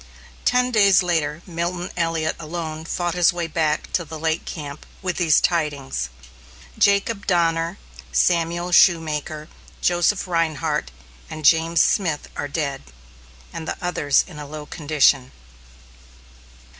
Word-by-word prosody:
Ten 250 0 +3
days 200 -4 +5
later 160 -2 -1
Milton 175 +1 -3
Elliot 165 -2 0
alone 160 -1 -5
fought 175 0 -2
his 180 0 +4
way 175 -1 -3
back 155 -1 -1
to 175 - +1
the 160 0 -8
lake 160 +1 -1
camp 145 -2 -7 0.2
with 185 -2 -2
these 165 -4 +4
tidings: 145 - -1 0.7
"Jacob 200 +1 +2
Donner, 170 -1 +1 0.3
Samuel 170 - +1
Shoemaker, 155 -3 +3 0.3
Joseph 175 +3 +1
Rhinehart, 160 - -1 0.4
and 155 -1 -7
James 165 +2 +5
Smith 165 -7 0
are 145 - -3
dead, 140 -2 -3 0.7
and 160 - -6
the - - -3
others 145 -6 +2
in 165 -5 -11
a 145 - -7
low 150 0 -7
condition." 145 -4 +2
165 Hz, 125 wpm, -22 LUFS, 150-175 Hz, 0.7 s, days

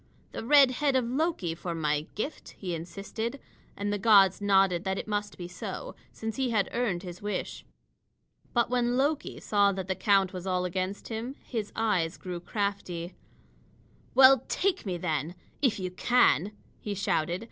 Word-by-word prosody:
"The - - -6
red 275 +1 +6
head 280 +1 +1
of 255 -2 +2
Loki 255 - -1
for 170 +1 -5
my 150 -1 0
gift," 275 +9 -5
he 180 -3 -4
insisted, 195 - -5 0.4
and 205 +1 -1
the 205 - -1
gods 195 -3 +5
nodded 195 -3 +3
that 190 0 -1
it - - -5
must 205 -1 -2
be 175 - -6
so, 180 - -6 0.2
since 225 +1 -5
he 265 -2 0
had 215 -4 +1
earned 210 -7 -1
his 180 -1 -8
wish. 205 0 -4 0.9
But 240 -1 +1
when 245 0 +1
Loki 290 +3 0
saw 200 -1 +3
that 190 -1 -5
the 190 - +1
count 195 -1 +2
was 185 0 -6
all 180 -1 0
against 185 +2 -3
him, 230 +4 -4
his 220 -4 -4
eyes 185 -7 0
grew 180 -2 -6
crafty. 180 -2 -3 1.0
"Well, 265 -1 +8
take 380 - 0
me, 180 -2 -1
then 160 -1 -2 0.3
if 255 -8 +2
you 185 -1 -3
can!" 210 - +3 0.3
he 205 -1 -4
shouted. 175 -2 0
200 Hz, 170 wpm, -28 LUFS, 180-240 Hz, 1.0 s, Well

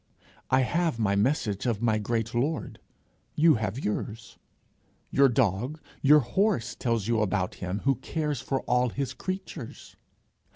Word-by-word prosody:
I 130 0 +4
have 165 +1 0
my 105 -3 +1
message 105 -1 0
of 115 -4 0
my 110 -2 +2
great 115 +1 -2
Lord, 140 +7 -2 0.6
you 160 +1 +6
have 110 +6 -3
yours. 105 +1 -4 0.7
Your 140 0 +5
dog, 120 - 0 0.2
your 150 +2 +6
horse 190 - 0
tells 115 -4 -1
you 115 -2 +2
about 95 -2 0
him 90 +3 -3
who 135 - +3
cares 150 +1 -3
for 135 +1 -2
all 125 0 +1
his 130 +2 -3
creatures. 185 -9 -7
120 Hz, 140 wpm, -27 LUFS, 110-145 Hz, 0.7 s, you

